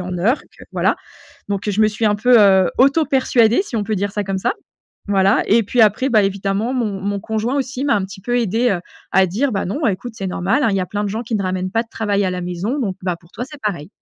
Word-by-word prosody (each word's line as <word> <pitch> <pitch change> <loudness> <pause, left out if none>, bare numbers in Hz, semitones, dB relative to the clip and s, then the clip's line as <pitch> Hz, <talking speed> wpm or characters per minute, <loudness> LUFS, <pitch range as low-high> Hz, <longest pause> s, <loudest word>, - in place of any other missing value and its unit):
en 180 0 -4
heure 220 - +1
et - - -24
que - - -13
voilà. - - +1 0.5
Donc 200 +1 -2
je 205 +1 0
me 215 - +5
suis 215 +1 -1
un 210 - +3
peu, 240 +4 +5
heu, 190 -3 +5
auto 280 +5 +4
persuadée 250 -2 +3
si 255 - -6
on 210 - -1
peut 215 +1 -1
dire 200 +1 -1
ça 210 - -1
comme 195 0 -2
ça 285 - 0 0.6
voilà. 195 +1 +3
Et 230 +2 +4
puis 235 +4 0
après, 220 +5 +3
bah, 215 -3 +4
évidemment 200 +5 -1
mon 210 -6 -2
mon 200 +1 -2
conjoint 220 +5 -2
aussi 265 -1 -3
m'a 280 - +2
un 205 - +1
petit 190 0 -10
peu 245 +5 0
aidée, 230 +2 +1
heu, 180 - -2 0.3
à 190 - +4
dire: 235 +9 -1
«Bah, 195 - -1
non 250 - -2
écoute 210 +4 -2
c'est 195 -3 -5
normal, 190 +9 0
hein, 255 - +3
il 195 - 0
y - - +1
a 180 - -2
plein 205 0 -3
de 205 - -1
gens 220 +4 -3
qui 230 -1 -4
ne 200 - 0
ramènent 185 0 -2
pas 225 +2 +1
de 230 - -22
travail 205 -3 -1
à - - 0
la 180 0 -4
maison 180 +10 -3
donc, 200 -9 -2
bah, 180 -2 -1
pour 170 0 -23
toi 245 - -5
c'est 295 -2 -11
pareil». 175 -8 -3
210 Hz, 280 wpm, -19 LUFS, 190-240 Hz, 0.6 s, me